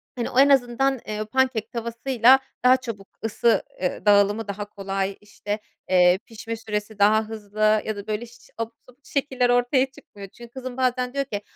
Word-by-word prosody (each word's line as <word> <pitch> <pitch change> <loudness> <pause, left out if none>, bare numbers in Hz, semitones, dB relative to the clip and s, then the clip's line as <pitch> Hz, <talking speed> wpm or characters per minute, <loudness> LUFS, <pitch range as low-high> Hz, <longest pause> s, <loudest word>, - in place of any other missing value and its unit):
hani, 240 -2 -2
o 250 - +1
en 280 +1 +7
azından, 270 0 +2
eee, 215 0 -3
pancake 255 -1 0
tavasıyla 235 +2 +3 0.2
daha 255 +1 +6
çabuk 230 -6 -8 0.2
ısı, 225 +1 +2 0.2
eee, 180 - -2
dağılımı 205 +1 +4
daha 200 +1 -4
kolay. 195 -1 -3
İşte, 205 0 -5 0.3
eee, 180 0 +5
pişme 230 -1 -6
süresi 210 -1 -5
daha 215 +2 +5
hızlı 215 0 +1
ya 215 - -2
da, 200 +1 -8
böyle, 215 +2 -2
iş 240 +1 -18
abuk 230 0 -4 0.2
subuk 260 +3 -22
şekiller 260 -3 0
ortaya 245 +2 +3
çıkmıyor. 200 -6 -12
Çünkü 235 +3 -14
kızım 255 -1 -7
bazen 250 -1 0
diyor 275 0 -1
ki 205 -6 -4
225 Hz, 175 wpm, -24 LUFS, 210-255 Hz, 0.3 s, en